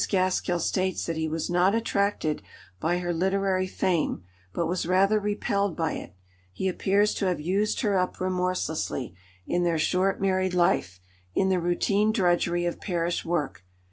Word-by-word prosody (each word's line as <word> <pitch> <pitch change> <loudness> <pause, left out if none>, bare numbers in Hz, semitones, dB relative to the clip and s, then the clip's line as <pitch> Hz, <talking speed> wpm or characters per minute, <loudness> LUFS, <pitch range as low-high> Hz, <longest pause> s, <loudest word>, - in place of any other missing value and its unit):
Gaskell 185 -2 +1
states 185 +2 -1
that 165 - -2
he 160 0 -1
was 160 0 -2
not 180 +4 +3
attracted 200 -8 0 0.4
by 175 - +1
her 175 -1 -2
literary 190 +1 +1
fame, 175 - 0 0.3
but 170 - -1
was 175 0 -1
rather 195 +4 +3
repelled 200 -2 -1
by 160 -2 0
it; - - -8 0.4
he 145 - -2
appears 200 +3 +2
to 195 - -1
have 180 -3 0
used 195 +7 0
her 205 -5 +2
up 180 - -2
remorselessly, 180 - -2 0.3
in 175 - 0
their 170 -2 +1
short 185 +4 +1
married 185 -1 +1
life, 95 - +1 0.4
in 190 - +2
the 185 -1 +2
routine 200 +5 +1
drudgery 175 -4 +1
of 175 - -3
parish 175 -2 -1
work. 145 - -2
180 Hz, 160 wpm, -26 LUFS, 170-195 Hz, 0.4 s, not